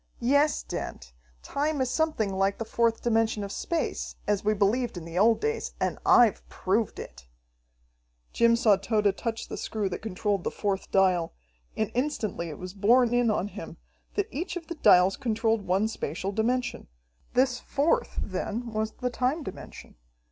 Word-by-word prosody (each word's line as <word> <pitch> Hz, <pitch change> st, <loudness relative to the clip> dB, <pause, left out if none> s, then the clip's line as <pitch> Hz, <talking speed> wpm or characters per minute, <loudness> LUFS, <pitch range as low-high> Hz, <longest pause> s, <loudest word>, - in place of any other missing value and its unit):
"Yes, 285 Hz, +5 st, +2 dB
Dent, -, -, -6 dB, 0.3 s
time 295 Hz, +1 st, -1 dB
is 255 Hz, -2 st, 0 dB
something 310 Hz, -11 st, 0 dB
like 195 Hz, +1 st, +1 dB
the 225 Hz, -, -4 dB
fourth 230 Hz, 0 st, +1 dB
dimension 225 Hz, -2 st, +1 dB
of 200 Hz, -, -5 dB
space, 335 Hz, +8 st, -3 dB
as 205 Hz, -1 st, 0 dB
we 215 Hz, +1 st, +2 dB
believed 215 Hz, +2 st, +1 dB
in 165 Hz, -, -7 dB
the 170 Hz, +2 st, -3 dB
old 225 Hz, +3 st, +5 dB
days, 450 Hz, +1 st, -2 dB
and -, -, -1 dB
I've 235 Hz, -4 st, +5 dB
proved 205 Hz, +3 st, -1 dB
it." -, -, -10 dB, 1.1 s
Jim 235 Hz, 0 st, +4 dB
saw 220 Hz, -4 st, +4 dB
Tode 205 Hz, 0 st, +1 dB
touch 230 Hz, 0 st, -4 dB
the -, -, -6 dB
screw 210 Hz, -3 st, -2 dB
that -, -, -5 dB
controlled 205 Hz, -2 st, -1 dB
the -, -, 0 dB
fourth 200 Hz, -2 st, -2 dB
dial, 185 Hz, -3 st, +2 dB, 0.4 s
and 220 Hz, -, -1 dB
instantly 230 Hz, -, -2 dB
it 150 Hz, -, -7 dB
was 185 Hz, 0 st, -7 dB
borne 235 Hz, +4 st, +4 dB
in 245 Hz, -1 st, +3 dB
on 205 Hz, -2 st, 0 dB
him -, -, -9 dB, 0.4 s
that -, -, 0 dB
each 345 Hz, +5 st, -4 dB
of 345 Hz, -2 st, -5 dB
the 340 Hz, -, -5 dB
dials 180 Hz, +2 st, +6 dB
controlled 225 Hz, -4 st, 0 dB
one 190 Hz, +4 st, +2 dB
spatial 190 Hz, -3 st, -4 dB
dimension. 240 Hz, +4 st, -1 dB, 0.5 s
This 250 Hz, -1 st, +3 dB
fourth, 285 Hz, +4 st, 0 dB
then, 220 Hz, +4 st, -4 dB
was 215 Hz, 0 st, -1 dB
the 250 Hz, 0 st, -3 dB
time 255 Hz, +6 st, 0 dB
dimension! 190 Hz, -, -10 dB
220 Hz, 170 wpm, -27 LUFS, 195-245 Hz, 1.1 s, dials